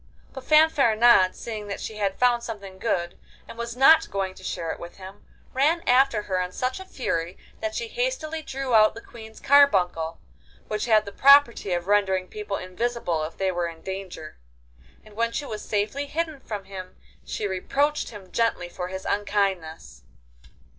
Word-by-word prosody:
But 265 - -8
Fanfaronade, 240 -10 +5
seeing 215 -3 -6
that 200 - -5
she 215 - -6
had 200 -2 -1
found 245 -1 +3
something 200 -5 -8
good, 175 -6 -2 0.3
and - - -10
was 235 +1 -6
not 295 +5 +6
going 195 -1 -2
to 190 - -15
share 165 -3 -3
it - - -7
with 170 0 -9
him, 190 +1 -11 0.3
ran 305 +6 +2
after 250 -4 +4
her 185 -3 -1
in 180 0 -3
such 255 +4 -2
a 380 - -9
fury 175 - -3 0.2
that 330 0 -3
she 470 - -3
hastily 450 -10 -2
drew 270 -4 -4
out 215 -1 +5
the 230 - -8
Queen's 220 -2 -12
carbuncle, 185 - +3 0.5
which 215 0 -2
had 215 -2 +4
the 200 - -7
property 270 -5 +5
of 175 0 -2
rendering 190 -2 +1
people 210 -1 -5
invisible 185 -3 -2
if 160 - -9
they 190 -1 0
were 175 -1 -1
in 165 -1 -10
danger, 190 - -7 0.7
and 215 -1 -16
when 230 +1 0
she 290 - -3
was 215 -5 -6
safely 215 +7 -2
hidden 315 -1 -3
from 210 -6 -6
him 190 -1 -9 0.3
she 210 - -4
reproached 280 +10 0
him 200 -5 -12
gently 230 -6 0
for 180 0 -5
his 190 +1 -7
unkindness. 190 - -2
210 Hz, 175 wpm, -25 LUFS, 185-255 Hz, 0.7 s, not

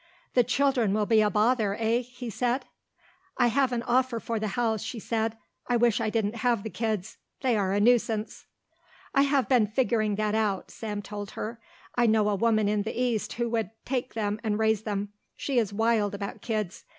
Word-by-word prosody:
"The 245 - +5
children 250 -5 +2
will 215 -1 +1
be 220 0 +4
a 210 - +3
bother, 215 -1 +2
eh?" 225 +1 +2
he 245 -1 -7
said. 245 +4 0 0.7
"I 245 -2 +4
have 265 +2 +2
an 240 -1 -1
offer 250 -1 +1
for 230 0 -3
the 215 - -1
house," 225 -3 +1
she 245 - -5
said. 225 0 -2 0.3
"I 245 - +2
wish 235 0 +3
I 220 - 0
didn't 220 0 -1
have 235 -2 +1
the 220 - -5
kids. 220 -4 -3 0.2
They 255 -3 +2
are 195 -3 +1
a 200 - +2
nuisance." 225 -1 +1 0.7
"I 275 - +5
have 280 -1 +2
been 245 -5 +4
figuring 220 -2 +1
that 210 0 0
out," 210 -3 0
Sam 210 -2 -5
told 205 0 -6
her. 230 +2 -4 0.3
"I 240 -1 +3
know 215 -1 +3
a 205 - +1
woman 215 0 +2
in 210 0 +1
the 220 +3 -4
East 240 -4 0
who 235 0 -1
would 225 -5 0 0.2
take 250 -3 -2
them 210 -1 -1
and 210 -2 0
raise 220 -1 +2
them. 205 -2 -3 0.3
She 270 -3 0
is 215 -4 0
wild 220 -1 +1
about 200 0 -6
kids. 215 -5 -3
225 Hz, 200 wpm, -27 LUFS, 210-240 Hz, 0.7 s, The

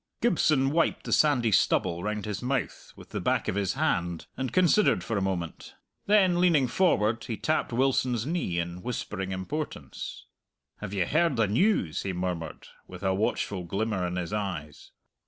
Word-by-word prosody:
Gibson 155 - +2
wiped 165 +2 +1
the - - -2
sandy 125 -7 +3
stubble 90 -3 +2
round 105 +1 -3
his 105 -2 -4
mouth 130 +2 -3
with - - -14
the - - -4
back - - 0
of - - 0
his 100 -1 0
hand, 85 - -1
and 130 -2 -3
considered 185 +5 +3
for 115 - -3
a 100 - 0
moment. 90 -4 -4 0.3
Then, 190 -4 +4
leaning 160 -7 +4
forward, 115 - +2
he 115 - -4
tapped 155 -3 0
Wilson's 125 -2 +1
knee 155 - -1
in 85 +1 -3
whispering 95 -5 -4
importance. 95 - -5 0.5
"Have 105 -2 -6
you 95 -3 +1
heard 155 - +2
the 115 -3 +2
news?" 105 - +1
he 95 - -3
murmured, 90 -2 -4 0.2
with 90 +1 -10
a 95 -1 +2
watchful 100 -1 -1
glimmer 95 +1 -1
in 90 - -4
his 90 +2 -3
eyes. 90 -8 -4
105 Hz, 170 wpm, -28 LUFS, 90-140 Hz, 0.5 s, Then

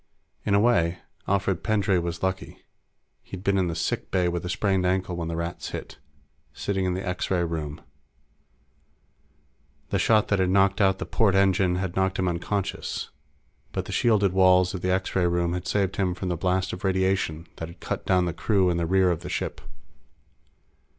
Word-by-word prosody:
In 100 - +3
a - - +5
way, 90 -7 +3 0.3
Alfred 95 -2 0
Pendray 105 -4 +2
was 85 0 -4
lucky. 95 +1 -2 0.6
He'd 95 -1 -9
been 100 -1 +2
in 90 - +1
the 85 - -3
sick - - -2
bay 90 -1 +1
with 85 0 -2
a 90 - -4
sprained 95 0 +1
ankle 90 0 0
when 85 -1 -3
the 85 - -3
Rats 85 +1 -4
hit, - - -7 0.5
sitting 95 -2 -2
in 90 -1 0
the 95 +1 -4
X 90 0 -2
ray 90 -2 +1
room. 80 -2 -4 2.1
The - - +1
shot 110 -2 +3
that 100 - +2
had 95 -1 +2
knocked 100 +2 +3
out 95 -1 +4
the - - -4
port 105 -5 +2
engine 95 -2 +3
had 90 -1 -3
knocked 95 0 +1
him 95 - 0
unconscious, 90 +3 -3 0.6
but - - -2
the - - -7
shielded 105 -5 +2
walls 90 -1 +4
of 95 - -5
the 90 - -1
X 95 0 -1
ray 90 -2 +3
room 85 0 0
had 90 0 -4
saved 100 -2 0
him 90 -3 0
from 90 0 -4
the 90 - 0
blast 95 +2 0
of 90 - -7
radiation 95 -4 0
that 80 - -5
had 85 +1 -13
cut - - -4
down 90 -1 +2
the 85 - -2
crew 95 -2 +2
in 85 - -1
the 85 -1 -1
rear 95 0 +3
of 85 - -1
the - - -8
ship. - - -3
95 Hz, 195 wpm, -25 LUFS, 85-95 Hz, 2.1 s, a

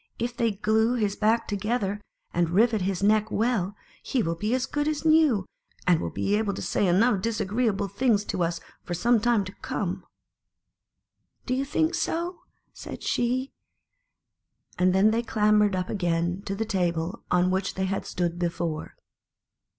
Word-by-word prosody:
If 235 +1 -3
they 230 -3 +1
glue 220 +4 +2
his 210 -4 0
back 225 +2 +1
together, 205 0 -1 0.3
and 170 -1 +1
rivet 220 +4 +3
his 190 0 -1
neck 215 +1 +3
well, 215 -4 0 0.3
he 250 -4 0
will 165 - 0
be 205 +6 -4
tjp - - +1
(Pju - - +4
as 260 0 0
good 295 +1 -2
as 310 +1 -2
new, 310 -11 +4 0.4
and 175 -3 +3
will - - -2
be 200 - -1
able 210 -2 -1
to - - -5
say 200 - +1
enough 200 +3 +3
disagreeable 215 -1 0
things 210 0 +1
to - - -3
us 170 0 0 0.2
for 175 - -4
some 235 +6 +3
time 235 -2 +2
to 185 - -8
come." - - -3 1.4
"Do 255 - -1
you 265 +2 0
think 315 +4 +1
so?" 340 +1 -2 0.3
said - - -9
she; 255 +3 0 1.3
and 185 0 +4
then 195 +4 +4
they 230 +1 +1
clambered 210 -3 +2
up 185 0 -2
again 175 -1 -1
to 195 - -2
the 225 +3 -2
table 175 -4 -1
on 180 +1 +3
which 190 +1 -1
they 190 - -1
had 195 +1 -3
stood 175 -1 -2
before. 170 -2 -3
210 Hz, 175 wpm, -26 LUFS, 185-235 Hz, 1.4 s, Pju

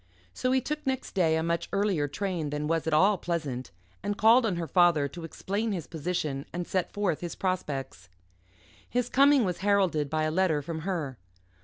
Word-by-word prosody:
So 255 - -1
he 260 0 +3
took 300 +2 -4
next 265 -1 -2
day 165 -5 +3
a 160 - 0
much 170 0 -1
earlier 195 -7 +1
train 170 0 -3
than 150 +1 -3
was 165 0 0
at 160 - 0
all 190 +5 +4
pleasant, 150 -8 -3 0.3
and 205 0 -2
called 225 +2 +6
on 195 - -1
her 170 -1 -2
father 170 -6 +4
to 170 +5 -9
explain 200 +6 -2
his 170 -5 -4
position 155 -4 -3
and 175 0 -3
set 185 0 -1
forth 200 -6 -1
his 175 -1 -5
prospects. 140 - -3 0.8
His 245 0 0
coming 275 -2 +5
was 180 -2 -2
heralded 190 -7 +2
by 155 +1 0
a 155 - 0
letter 160 -4 +1
from 160 +2 -4
her. 150 -9 -3
175 Hz, 190 wpm, -28 LUFS, 155-200 Hz, 0.8 s, called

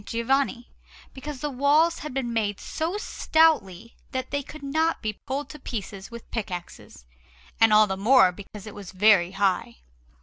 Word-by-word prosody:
Giovanni, 245 +2 0 0.5
because 275 0 -7
the 295 - -2
walls 295 +6 +3
had 300 - -6
been 250 -3 -3
made 205 -3 -1
so 330 +5 -3
stoutly 290 - +1 0.2
that 260 0 -3
they 285 0 0
could 290 +2 -12
not 315 +4 0
be 215 -1 -4
pulled 275 +2 -3
to 300 - -11
pieces 200 -6 -6
with 235 -1 -11
pickaxes, 180 - -6 0.5
and 225 -1 +6
all 215 0 +7
the 190 -2 -3
more 215 -1 +5
because 200 +2 -11
it 215 - -9
was 195 -3 -10
very 190 -2 +4
high. 190 -10 0
235 Hz, 165 wpm, -25 LUFS, 200-285 Hz, 0.5 s, all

